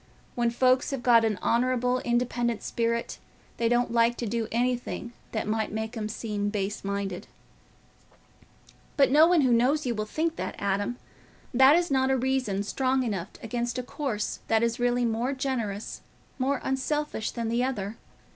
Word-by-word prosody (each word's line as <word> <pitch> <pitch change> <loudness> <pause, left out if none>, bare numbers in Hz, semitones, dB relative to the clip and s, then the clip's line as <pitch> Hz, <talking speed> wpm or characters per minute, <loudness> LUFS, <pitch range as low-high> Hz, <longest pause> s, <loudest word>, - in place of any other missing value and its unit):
When 240 -1 +1
folks 255 +2 +3
have 270 -3 -4
got 235 -2 +6
an 215 -3 +1
honourable 250 +1 +2
independent 240 -1 0
spirit, 235 0 -1 0.4
they 230 -1 +1
don't 240 0 +2
like 235 0 +3
to 240 - -3
do 225 0 -2
anything 240 0 -1 0.2
that 220 - -2
might 220 0 -1
make 220 +2 -4
'em 215 -2 -3
seem 210 -2 -2
base 205 0 -3
minded." 200 -2 -3 1.7
"But 275 -2 +5
no 305 +3 +7
one 350 -2 +4
who 255 -3 +3
knows 265 +6 +2
you 245 - 0
will 215 -1 -3
think 320 +7 -1
that, - - -4
Adam. 200 +4 -1 0.6
That 265 +4 +7
is 345 -2 +1
not 265 -1 +2
a 265 - +3
reason 255 -6 0
strong 260 +4 0
enough 200 -6 -3
against 240 +2 -2
a 250 - -2
course 245 -5 -3
that 225 0 +3
is 235 +1 0
really 245 0 +2
more 235 +4 0
generous, 240 -7 -3 0.4
more 270 +1 0
unselfish 265 -2 -1
than 230 -2 -3
the 235 +2 +1
other. 225 -5 -3
240 Hz, 165 wpm, -27 LUFS, 220-260 Hz, 1.7 s, no